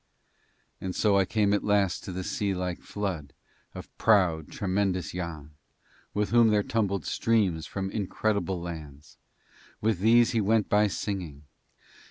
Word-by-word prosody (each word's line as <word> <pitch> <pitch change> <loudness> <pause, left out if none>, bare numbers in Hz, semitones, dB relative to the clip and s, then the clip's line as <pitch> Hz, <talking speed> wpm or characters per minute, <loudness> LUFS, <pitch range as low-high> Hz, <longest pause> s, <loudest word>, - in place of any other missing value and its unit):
And 95 -1 -4
so 105 -2 +3
I 100 -1 +4
came 105 -1 +1
at 105 - +1
last 100 -3 +1
to - - -5
the 95 +1 -4
sea 100 +1 -1
like 90 -1 -3
flood 95 -8 -4 0.4
of - - -10
proud, 90 -8 +3
tremendous 95 -2 -1
Yann, 80 -5 -6 0.6
with 105 0 0
whom 120 -1 +6
there 105 -1 +3
tumbled 100 -7 -1
streams 100 -8 +1
from 95 -1 -4
incredible 100 -2 -1
lands 75 -4 -9 0.6
with 110 -4 0
these 115 +3 +5
he 115 -3 +1
went 105 +1 +2
by 105 0 +4
singing. 90 -8 -4
100 Hz, 145 wpm, -27 LUFS, 90-105 Hz, 0.6 s, whom